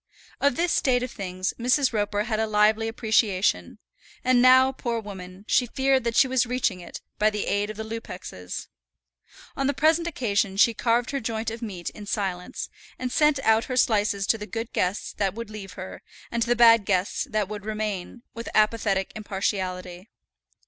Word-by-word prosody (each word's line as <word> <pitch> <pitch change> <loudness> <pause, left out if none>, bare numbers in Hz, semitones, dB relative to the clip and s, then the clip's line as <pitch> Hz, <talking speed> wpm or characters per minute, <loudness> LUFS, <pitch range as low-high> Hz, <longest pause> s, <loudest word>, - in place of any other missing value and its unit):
Of 280 -3 +2
this 345 +3 +1
state 250 -2 +2
of 250 - -4
things 185 -2 -3
Mrs. 255 +2 +2
Roper 205 -1 0
had 220 -1 -2
a 220 - +1
lively 215 +1 +3
appreciation, 220 -3 +1 0.5
and 255 -1 +4
now, 260 +1 +6
poor 235 -3 -3
woman, 190 -2 -9
she 250 - +3
feared 265 0 +1
that 230 -1 -1
she 265 - +6
was 255 -1 +1
reaching 245 -6 0
it, 175 - -9 0.2
by 215 - +4
the 210 -1 -3
aid 205 +1 0
of 215 - -7
the 220 - -4
Lupexes. 185 - -7 0.9
On 275 - 0
the 280 - 0
present 325 +4 +3
occasion 205 - -1
she 230 +3 +5
carved 235 +2 +1
her 280 - -1
joint 225 -1 -3
of 225 +1 -7
meat 190 -7 -5
in 205 -1 -11
silence, 195 +1 -3 0.3
and 255 -1 -4
sent 300 +1 +3
out 225 -1 +3
her 255 - -3
slices 205 -4 +2
to 225 - +1
the 210 - -6
good 225 +1 -5
guests 185 +3 -1
that 195 -1 -1
would 230 -2 -7
leave 195 -3 -8
her, 185 0 -8 0.3
and 235 - -1
to 235 - 0
the 240 - +4
bad 230 -2 +7
guests 190 +7 0
that 215 -4 0
would 210 0 -7
remain, 215 +1 -4
with 230 0 -6
apathetic 210 -3 +2
impartiality. 190 -3 -3
220 Hz, 185 wpm, -25 LUFS, 200-245 Hz, 0.9 s, bad